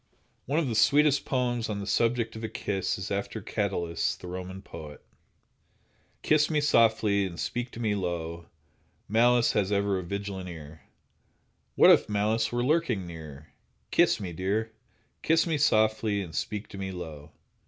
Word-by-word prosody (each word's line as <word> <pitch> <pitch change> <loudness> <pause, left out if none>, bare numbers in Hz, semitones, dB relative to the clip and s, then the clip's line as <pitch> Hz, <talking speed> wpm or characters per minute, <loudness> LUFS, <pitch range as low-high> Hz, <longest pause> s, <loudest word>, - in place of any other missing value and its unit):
One 140 +4 0
of 165 -4 +1
the 120 - -2
sweetest 145 +6 +4
poems 120 -3 -1
on 105 - -2
the 100 - -5
subject 115 +1 0
of 110 - -7
a 110 - -3
kiss 95 -2 -2
is - - -6
after - - -3
Catullus, 85 -1 -2
the - - -13
Roman 95 +2 -7
poet: 75 -5 -10 1.2
Kiss 150 -1 +3
me 155 -2 +1
softly, 110 -7 +3
and 85 -2 -9
speak 120 0 -3
to - - -8
me 110 -3 0
low, 85 -3 -4 0.6
Malice 120 +2 +4
has 100 -1 0
ever 100 -1 +1
a - - -5
vigilant 100 0 -5
ear; 80 -2 -10 0.9
What - - +8
if - - +4
Malice 110 +2 +1
were 120 0 0
lurking 135 - +1
near? 80 -4 -10 0.4
Kiss - - +4
me, 90 -4 -5
dear! 100 +6 -1 0.5
Kiss 165 0 +3
me 160 -3 -1
softly, 110 -5 +2
and 85 -4 -10
speak 105 -1 -3
to 100 - -9
me 95 -1 -4
low. 80 -5 -8
105 Hz, 165 wpm, -28 LUFS, 90-120 Hz, 1.2 s, What